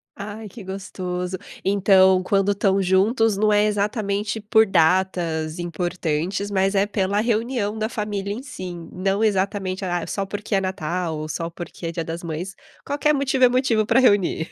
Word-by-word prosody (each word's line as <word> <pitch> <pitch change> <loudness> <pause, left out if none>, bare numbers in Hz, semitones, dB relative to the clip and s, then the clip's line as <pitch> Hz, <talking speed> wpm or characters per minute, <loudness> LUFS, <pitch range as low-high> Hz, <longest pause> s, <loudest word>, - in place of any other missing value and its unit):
Ai, 210 +2 -7
que 210 +2 -11
gostoso. 185 -1 -4 0.3
Então, 190 -1 +5
quando 195 +2 +1
estão 195 -1 +2
juntos 205 +4 +2
não 210 +2 +2
é 210 0 +4
exatamente 210 0 -1
por 220 +1 +4
datas 170 -3 +1
importantes, 175 +2 -2
mas 195 0 +1
é 195 0 +3
pela 200 -1 0
reunião 225 -1 0
da 220 0 -1
família, 205 -3 -3
em 230 +5 -5
si. 185 -9 -7 0.2
Não 195 +3 0
exatamente, 195 -2 0
ah, 175 -2 -1
só 200 - -3
porque 205 +2 -5
é 195 - +3
Natal 180 -3 -2
ou 155 0 -5
só 165 +2 -3
porque 170 0 -8
é - - -2
Dia 165 0 -3
das 165 +1 -5
Mães. 170 +4 -5 0.3
Qualquer 290 +2 +1
motivo 270 -2 +1
é - - +5
motivo 245 -4 +1
pra 230 +3 +4
reunir. 205 -9 +2
195 Hz, 170 wpm, -22 LUFS, 180-210 Hz, 0.3 s, Então